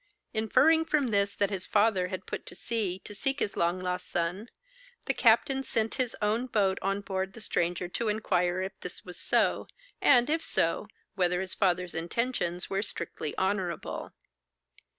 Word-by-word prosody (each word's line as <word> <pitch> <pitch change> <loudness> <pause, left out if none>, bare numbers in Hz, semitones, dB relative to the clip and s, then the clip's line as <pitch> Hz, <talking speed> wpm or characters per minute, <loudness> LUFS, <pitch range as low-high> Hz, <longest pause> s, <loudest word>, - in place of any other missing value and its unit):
Inferring 300 +9 +4
from 295 -6 +1
this, 200 -1 +2
that 200 +1 +1
his 190 -2 -3
father 205 -4 +3
had 185 +1 -5
put - - -6
to - - -9
sea 215 -6 -2
to 210 - -8
seek 270 +7 -1
his 205 - -1
long 170 +2 +1
lost 180 0 -3
son, 175 +7 -2 0.6
the - - +1
captain 270 -3 +4
sent 225 -4 -1
his 245 -3 -2
own 220 +4 +1
boat 200 -5 +1
on 195 +1 0
board 190 -1 -3
the - - -10
stranger 175 -4 -1
to 225 +6 -3
inquire 185 -4 +1
if 190 - -3
this 180 - -7
was 180 -1 -6
so, - - +2 0.3
and, 245 -3 +6
if 320 +2 0
so, 165 +5 0 0.3
whether 180 -2 +1
his 190 -1 -3
father's 180 -2 +1
intentions 175 +1 -1
were 195 0 -1
strictly 155 -6 -4
honourable. 190 -4 -2
195 Hz, 170 wpm, -29 LUFS, 180-225 Hz, 0.6 s, and